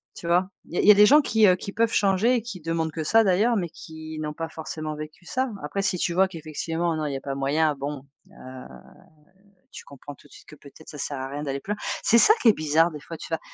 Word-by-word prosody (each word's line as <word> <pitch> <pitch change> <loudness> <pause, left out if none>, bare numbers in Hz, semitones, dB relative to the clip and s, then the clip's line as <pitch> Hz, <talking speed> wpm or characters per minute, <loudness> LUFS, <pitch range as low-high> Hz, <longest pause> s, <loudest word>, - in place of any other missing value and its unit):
tu 170 - -8
vois? 180 +2 +2 0.2
Il - - -10
y - - -1
a - - +4
il - - 0
y - - +11
a - - +6
des 210 +1 +7
gens 295 +3 +7
qui, 220 -5 +3
heu, 180 - +5
qui 200 +2 -7
peuvent 225 +1 +1
changer 205 +5 +2
et 235 - 0
qui 205 -7 -8
demandent 165 0 -2
que 160 +1 -4
ça 225 +8 +4
d'ailleurs, 210 +5 +2
mais 175 -4 -2
qui 160 0 -10
n'ont 150 -1 -4
pas 165 +1 -5
forcément 155 -1 -6
vécu 155 +3 -10
ça. 260 +8 -2
Après 150 +7 -3
si 195 -2 0
tu 170 - -1
vois 190 +2 +3
qu'effectivement 165 0 -3
non, 155 -1 -3
il 145 - -4
y 135 - -2
a - - -9
pas 140 - -4
moyen 150 +3 +1
bon, 140 0 -6 0.3
heu, 130 0 -11 1.1
tu - - -10
comprends 140 +1 -11
tout - - -21
de - - -24
suite - - -16
que 150 - -13
peut-être 145 +2 -16
ça - - -10
sert 140 0 -4
à 130 - -4
rien 145 +2 -6
d'aller 140 -1 -3
plus 205 - -4
loin. - - -15 0.2
C'est 235 - +4
ça 405 - +7
qui 230 - +5
est 215 - +6
bizarre 155 +2 +2
des 150 - -8
fois 165 +2 -9
tu - - -9
vas 165 - -1
165 Hz, 285 wpm, -24 LUFS, 150-195 Hz, 1.1 s, y